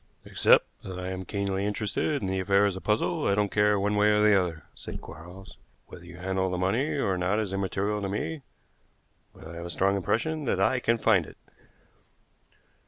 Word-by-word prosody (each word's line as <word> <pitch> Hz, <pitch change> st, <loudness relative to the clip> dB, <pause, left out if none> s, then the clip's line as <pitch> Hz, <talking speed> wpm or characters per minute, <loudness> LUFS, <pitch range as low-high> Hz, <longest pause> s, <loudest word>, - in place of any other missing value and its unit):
"Except -, -, +4 dB, 0.2 s
that 95 Hz, -1 st, -7 dB
I 90 Hz, 0 st, -4 dB
am 95 Hz, 0 st, -5 dB
keenly 100 Hz, 0 st, -2 dB
interested 105 Hz, +8 st, -1 dB
in -, -, -1 dB
the 95 Hz, 0 st, -1 dB
affair 100 Hz, +1 st, +3 dB
as 100 Hz, -2 st, 0 dB
a 95 Hz, -, -7 dB
puzzle, 100 Hz, -5 st, 0 dB
I 100 Hz, -, +3 dB
don't 105 Hz, -1 st, 0 dB
care 105 Hz, -1 st, +3 dB
one 105 Hz, +1 st, 0 dB
way 105 Hz, +1 st, +4 dB
or 105 Hz, 0 st, +3 dB
the 105 Hz, 0 st, +5 dB
other," 85 Hz, -4 st, -1 dB
said -, -, -8 dB
Quarles. 90 Hz, +5 st, -12 dB, 0.3 s
"Whether -, -, -12 dB
you -, -, -11 dB
handle 95 Hz, +1 st, -1 dB
the 90 Hz, -, -2 dB
money 110 Hz, +13 st, 0 dB
or 95 Hz, -9 st, 0 dB
not 95 Hz, +3 st, +1 dB
is 100 Hz, -3 st, -3 dB
immaterial 100 Hz, +2 st, -1 dB
to 100 Hz, -, -3 dB
me, 140 Hz, +10 st, -3 dB, 0.9 s
but -, -, -13 dB
I 85 Hz, -, -9 dB
have 85 Hz, -, -6 dB
a -, -, -8 dB
strong 95 Hz, +3 st, +1 dB
impression 150 Hz, -, -1 dB
that 105 Hz, -, 0 dB
I 110 Hz, +7 st, +2 dB
can 115 Hz, -1 st, +1 dB
find 100 Hz, -7 st, +3 dB
it." -, -, -14 dB
100 Hz, 205 wpm, -27 LUFS, 95-105 Hz, 0.9 s, the